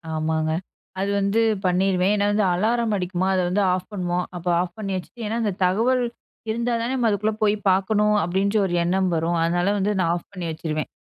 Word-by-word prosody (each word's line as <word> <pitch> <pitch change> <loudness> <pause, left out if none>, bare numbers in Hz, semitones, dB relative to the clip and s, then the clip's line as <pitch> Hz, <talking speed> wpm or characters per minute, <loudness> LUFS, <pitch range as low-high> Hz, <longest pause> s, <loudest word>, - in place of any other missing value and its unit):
ஆமாங்க. 155 0 0 0.5
அது 195 +1 0
வந்து 200 +3 +2 0.2
பண்ணிருவேன். 185 +1 +2
ஏன்னா 205 0 +1
வந்து 210 +1 +2
அலாரம் 225 +4 +1
அடிக்குமா 185 -1 -1
அத 185 - +2
வந்து 195 +3 +1
ஆஃப் 185 0 -4
பண்ணுவோம். 180 -2 -1
அப்ப 175 0 -7
ஆஃப் 180 -1 -5
பண்ணி 205 -3 -4
வச்சுட்டு, 185 +6 -7
ஏன்னா 225 +2 -2
அந்த 205 -3 0
தகவல் 235 +7 +2 0.5
இருந்தா 235 +2 -1
தான 235 - -2
நம்ம 245 -3 +1
அதுக்குள்ளே 210 +1 0
போய் 210 0 +3
பார்க்கணும் 210 +3 +2
அப்டின்ற 195 +5 0
ஒரு 180 - -2
எண்ணம் 185 +2 +1
வரும். 165 +1 0
அதனால 175 +3 +1
வந்து 200 +1 +1
நான் 170 -2 +2
ஆஃப் 175 - -8
பண்ணி 180 -3 -5
வச்சுருவேன். 155 -1 -3
190 Hz, 190 wpm, -23 LUFS, 175-210 Hz, 0.5 s, போய்